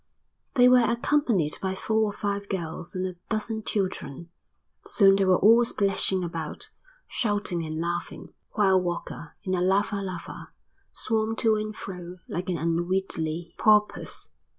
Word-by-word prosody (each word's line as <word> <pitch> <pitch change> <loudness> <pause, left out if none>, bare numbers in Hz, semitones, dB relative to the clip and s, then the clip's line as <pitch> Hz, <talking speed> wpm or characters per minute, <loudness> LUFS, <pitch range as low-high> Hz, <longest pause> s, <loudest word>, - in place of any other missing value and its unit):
They 250 -2 +7
were 250 0 +7
accompanied 235 - +1
by 190 0 -1
four 220 +3 0
or 210 - -1
five 200 0 -3
girls 170 -2 -4
and 185 0 -1
a 180 -1 -5
dozen 220 0 -1
children. 175 -7 -3 0.5
Soon 195 -2 +5
they 195 0 +2
were 185 -1 +5
all 230 +4 +6
splashing 195 -4 +1
about, 165 -3 -4 0.4
shouting 205 -6 -1
and 155 0 -4
laughing, 170 +1 -4 0.2
while 190 -3 +4
Walker, 175 -2 -5
in 185 - -2
a 180 - +1
lava 200 +2 +1
lava, 185 -3 -7 0.4
swam 220 -1 -1
to 220 -1 +3
and 215 0 -3
fro 180 -3 -8
like 180 +2 -4
an 175 - 0
unwieldy 170 -1 -1
porpoise. 210 -1 +2
190 Hz, 145 wpm, -26 LUFS, 175-215 Hz, 0.5 s, They